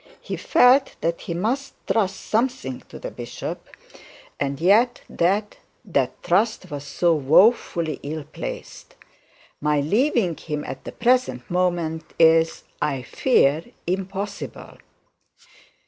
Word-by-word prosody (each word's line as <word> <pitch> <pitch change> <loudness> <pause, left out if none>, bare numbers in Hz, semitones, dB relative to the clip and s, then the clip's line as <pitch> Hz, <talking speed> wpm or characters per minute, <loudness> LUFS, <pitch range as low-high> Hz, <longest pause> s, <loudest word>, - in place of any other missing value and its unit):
He - - -5
felt 260 +2 +4
that 170 0 -1
he 170 - -4
must 245 +10 -2
trust 195 -4 0
something 220 - -1
to - - -9
the - - -6
bishop, - - -7 0.7
and 140 -1 -2
yet 220 +8 +4
that 200 +5 0 0.6
trust 185 +1 +1
was 145 -1 -5
so 170 +4 +2
woefully 160 - +3
misplaced. 150 +1 -7 0.7
'My 150 0 +2
leaving 205 - +1
him 150 -2 -4
at 135 - -7
the - - -5
present 235 - +1
moment 175 -3 -1
is, 165 0 +4 0.2
I 135 -4 -1
fear, 155 - +2 0.2
impossible.' 195 +2 -5
175 Hz, 110 wpm, -23 LUFS, 150-215 Hz, 0.7 s, felt